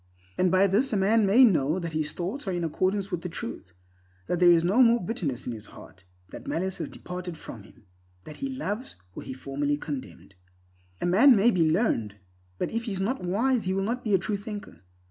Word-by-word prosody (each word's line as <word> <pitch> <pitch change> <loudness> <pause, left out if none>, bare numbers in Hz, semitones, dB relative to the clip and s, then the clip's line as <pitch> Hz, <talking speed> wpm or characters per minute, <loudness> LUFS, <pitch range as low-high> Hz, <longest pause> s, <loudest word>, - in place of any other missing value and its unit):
And 185 - +2
by 185 +2 +4
this 210 +8 +2
a - - +2
man 205 +2 +3
may 240 +7 +7
know 155 - +2
that 170 -3 -4
his 155 -1 -1
thoughts 195 +8 -5
are - - 0
in 175 -1 -2
accordance 190 +5 -1
with 175 -2 -2
the 180 - -5
Truth—that 90 - -8
there 175 -1 +6
is 165 -1 +4
no 200 +9 +3
more 235 -1 +5
bitterness 170 - -3
in 120 - -3
his 110 -2 -9
heart, 95 - -15 0.3
that - - -10
malice 190 +3 -2
has 160 - -4
departed 180 -2 -7
from - - -10
him; - - -19 0.4
that 150 - -11
he 275 - -4
loves 255 -2 -4 0.2
where - - -9
he - - -4
formerly 145 +2 -2
condemned. 140 -9 -7 0.7
A - - 0
man 225 +10 +6
may 220 +4 +4
be 165 -6 +2
learned, 155 - 0 0.4
but - - -2
if 230 +1 -2
he 215 - -3
is 190 - -4
not 220 +4 -2
wise 225 +7 +1
he 185 +1 0
will 195 - 0
not 235 +5 -2
be 210 -3 +2
a - - +5
true 200 +3 -2
thinker. 205 - -8
185 Hz, 220 wpm, -27 LUFS, 155-215 Hz, 0.7 s, may